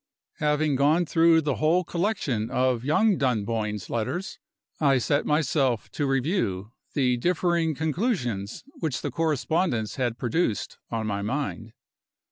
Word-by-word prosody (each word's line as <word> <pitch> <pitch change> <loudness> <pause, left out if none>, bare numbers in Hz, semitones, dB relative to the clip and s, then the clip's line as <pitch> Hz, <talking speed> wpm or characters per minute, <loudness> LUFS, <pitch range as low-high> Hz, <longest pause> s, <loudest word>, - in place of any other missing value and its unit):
Having 150 -1 +1
gone 155 +6 +3
through 165 0 +4
the 145 -3 -1
whole 165 +4 +3
collection 165 - -1
of 125 -2 +1
young 190 +8 +3
Dunboyne's 110 -5 -1
letters, 175 - -3 0.4
I 140 -3 +4
set 145 +4 0
myself 140 -5 +1
to 145 - -1
review 130 - -1 0.2
the 125 -3 +2
differing 170 +1 +1
conclusions 150 - -2 0.2
which 155 -6 -2
the - - -2
correspondence 155 - 0
had 120 -3 -1
produced 120 - -1
on 115 -1 -2
my 100 -1 -2
mind. 115 -1 -3
140 Hz, 125 wpm, -26 LUFS, 115-165 Hz, 0.4 s, through